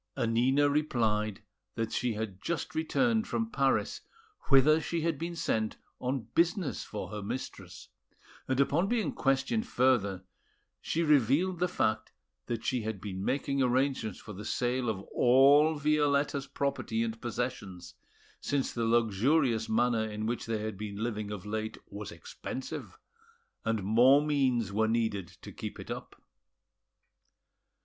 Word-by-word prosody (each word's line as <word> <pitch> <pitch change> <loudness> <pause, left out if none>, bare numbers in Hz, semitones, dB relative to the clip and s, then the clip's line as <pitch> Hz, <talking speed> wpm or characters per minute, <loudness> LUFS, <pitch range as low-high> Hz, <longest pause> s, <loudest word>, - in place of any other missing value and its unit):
Annina 125 +5 +3
replied 110 -8 0 0.3
that 115 0 -2
she 125 -2 0
had 105 -3 -5
just 170 -1 -3
returned 225 +8 +1
from 225 0 -2
Paris, 135 -1 +1 0.5
whither 150 +3 +6
she 170 +1 -2
had 160 -3 -1
been 170 +1 -4
sent 110 -9 -1 0.2
on 125 -3 -3
business 175 0 +1
for 105 - -6
her 105 -1 -5
mistress; 115 +6 -6 0.6
and 130 0 0
upon 150 +7 +2
being 230 -1 0
questioned 135 - 0
further, 115 - +2 0.6
she 170 - -1
revealed 150 - +3
the 180 - +2
fact 110 -11 -1 0.3
that 115 -2 -3
she 125 -2 0
had 110 -2 -4
been 95 0 -5
making 140 +3 0
arrangements 130 -4 +1
for 105 - -9
the 100 +2 -8
sale 125 +2 -1
of 100 -3 -2
all 140 +5 +6
Violetta's 145 -1 +1
property 115 -6 -1
and 115 0 -4
possessions, 110 -7 -4 0.5
since 140 -2 -1
the 115 -1 -1
luxurious 115 +2 +2
manner 115 -1 +2
in 105 0 -4
which 115 +1 -2
they 115 -1 0
had 110 -3 -5
been 105 -1 -5
living 105 -1 -3
of 105 -3 -6
late 110 +1 -3
was 100 0 -6
expensive, 130 - -7 0.7
and 110 -3 -1
more 125 +8 +5
means 130 -8 +1
were 110 +2 +2
needed 110 -5 0 0.2
to - - -8
keep - - -7
it - - -7
up. - - -7
125 Hz, 140 wpm, -30 LUFS, 110-145 Hz, 0.7 s, whither